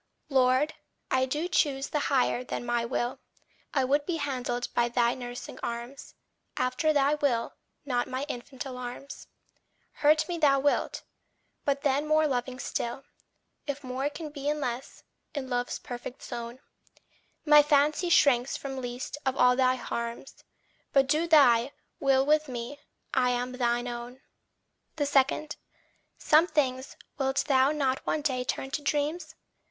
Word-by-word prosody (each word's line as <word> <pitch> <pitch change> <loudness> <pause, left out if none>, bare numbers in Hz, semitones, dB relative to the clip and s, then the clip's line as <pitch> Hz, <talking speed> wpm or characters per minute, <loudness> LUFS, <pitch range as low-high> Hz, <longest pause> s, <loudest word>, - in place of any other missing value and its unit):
LORD, 265 +2 +3 0.4
I 260 0 +2
do 300 +6 -1
choose 285 -6 +1
the 300 - 0
higher 255 -2 +2
than 245 - -5
my 240 -1 0
will. 240 0 -2 0.5
I 270 - +1
would 285 +3 +1
be 350 - 0
handled 250 -4 -2
by 240 0 +2
thy 240 0 +2
nursing 245 -1 -7
arms 235 +3 -6 0.4
After 255 +5 +1
thy 285 -1 +3
will, 275 -6 0 0.3
not 245 -3 0
my 260 +1 -3
infant 255 0 -6
alarms. 250 +2 -7 0.7
Hurt 310 +1 +4
me 345 -2 -3
thou 280 -3 +4
wilt 285 +1 0 0.6
but 280 0 0
then 285 +2 +1
more 310 0 +4
loving 255 -2 -2
still, 245 +1 -3 0.6
If 285 0 -4
more 260 +2 -2
can 300 +1 -7
be 285 -1 -3
and 300 0 -1
less, 250 -2 -5 0.3
in 265 -2 -4
love's 245 0 -1
perfect 245 +1 -8
zone! 235 +2 -6 0.8
My 295 -1 +8
fancy 295 +4 +2
shrinks 270 -6 +4
from 270 -1 -6
least 245 +4 -5
of 265 -1 -1
all 250 0 +5
thy 255 0 +3
harms, 235 0 -6 0.5
But 275 -1 +5
do 310 +5 +1
thy 270 -5 +5 0.3
will 270 -1 +3
with 305 +1 +3
me 250 +3 -6 0.3
I 250 -2 +3
am 245 0 -1
thine 240 -1 0
own. 240 +2 -7 0.8
2. 290 - +1 1.1
Some 315 +3 +4
things 260 -5 -1 0.2
wilt 270 0 +1
thou 270 0 +4
not 270 -3 0
one 305 - -1
day 260 -4 0
turn 270 +2 -3
to 295 - -2
dreams? 295 +4 -1
265 Hz, 145 wpm, -28 LUFS, 245-290 Hz, 1.1 s, My